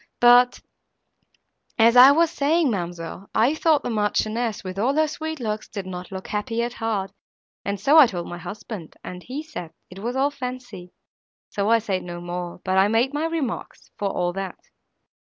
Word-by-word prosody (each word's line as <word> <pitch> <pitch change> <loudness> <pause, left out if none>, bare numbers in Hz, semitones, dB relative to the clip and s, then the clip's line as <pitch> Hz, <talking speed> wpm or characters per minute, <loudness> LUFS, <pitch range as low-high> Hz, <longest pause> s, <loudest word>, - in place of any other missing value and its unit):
—But, 245 +1 +6 1.2
as 230 +1 +5
I 250 +2 +10
was 325 +3 +4
saying, 300 0 +2
ma'amselle, 175 0 -5
I 240 +6 +4
thought 315 -2 +2
the - - -2
Marchioness, 215 +1 -1
with 185 0 -6
all 260 +6 +1
her 310 0 +3
sweet 315 0 -5
looks, 215 -3 -3
did 200 -3 -6
not 180 0 -7
look 190 0 -7
happy 225 +3 -1
at 240 0 -3
heart, 215 -5 -2 0.5
and 200 0 -3
so 285 +10 +6
I 285 - +9
told 175 -5 -5
my 175 - -7
husband, 200 -2 -8
and 180 0 -7
he 265 - -6
said 300 - -7 0.2
it 185 - -10
was 240 +5 -3
all 275 +2 +2
fancy; 250 -9 -7 0.6
so 205 +1 -1
I 230 - +6
said 200 -4 -2
no 175 -1 -7
more, 175 0 -6
but 185 0 +2
I 195 - +5
made 230 +6 +1
my 300 +2 -1
remarks, 320 -8 -4
for 200 - 0
all 175 -2 -1
that. 195 -1 -5
220 Hz, 185 wpm, -23 LUFS, 190-260 Hz, 1.2 s, I